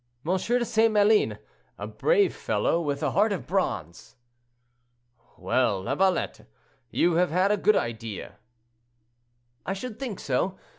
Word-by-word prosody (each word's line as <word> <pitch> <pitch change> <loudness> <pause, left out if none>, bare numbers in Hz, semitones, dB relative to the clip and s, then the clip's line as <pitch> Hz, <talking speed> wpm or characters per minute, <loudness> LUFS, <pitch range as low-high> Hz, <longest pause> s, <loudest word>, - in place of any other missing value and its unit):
de 225 +8 0
St. 225 0 +2
Maline, 210 0 +3 0.4
a - - -5
brave 435 -5 +1
fellow, 170 - 0
with 145 -2 -3
a 150 - +1
heart 205 +7 +2
of 195 - -3
bronze." 90 - -3 1.2
"Well, 105 -7 0
Lavalette, 190 - 0 0.4
you 170 -1 +2
have 180 +1 +3
had 185 +5 +2
a - - +4
good 210 +1 +3
idea." 115 - -4 1.3
"I 190 - -2
should 220 +3 -7
think 245 -8 -5
so. 180 +9 -1
190 Hz, 130 wpm, -26 LUFS, 145-215 Hz, 1.3 s, a